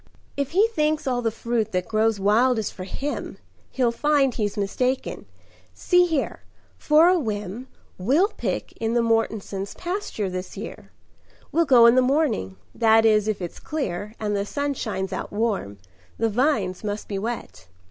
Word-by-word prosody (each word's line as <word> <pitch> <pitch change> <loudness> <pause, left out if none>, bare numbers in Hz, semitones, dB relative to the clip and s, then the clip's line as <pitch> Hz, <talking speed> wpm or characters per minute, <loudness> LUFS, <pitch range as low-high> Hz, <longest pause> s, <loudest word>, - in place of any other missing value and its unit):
"If 280 +1 -3
he 405 +5 +5
thinks 305 -6 0
all 250 -2 0
the 230 - +1
fruit 230 0 -2
that 180 -1 -1
grows 220 -1 +1
wild 225 +6 +3
is 220 - -2
for 185 - -8
him, 280 +9 -5 0.3
He'll 250 -3 +1
find 280 0 +2
he's 210 -2 -2
mistaken. 250 +6 -2 0.5
See 355 -1 +3
here, 315 -5 -1 0.4
for 305 +3 +4
a 365 0 +4
whim, 210 - -4 0.3
We'll 285 - +3
pick - - -4
in 225 +1 -1
the 235 - +3
Mortensons' 220 -3 -1
pasture 355 - -3
this 185 0 -6
year. - - -8 0.6
We'll 330 +3 +3
go 245 -5 +7
in 235 - +8
the 255 - +5
morning, 255 - +1 0.2
that 225 0 +4
is, 215 -1 +4
if 210 -4 -2
it's 175 - -6
clear, 210 - -4
And 210 -1 -1
the 200 - 0
sun 285 +7 -2
shines 195 -7 -3
out - - -5
warm: 205 - -1 0.4
the 225 0 +1
vines 215 -6 0
must 205 0 -4
be 200 -2 -3
wet. 225 - -6
225 Hz, 170 wpm, -24 LUFS, 205-280 Hz, 0.6 s, in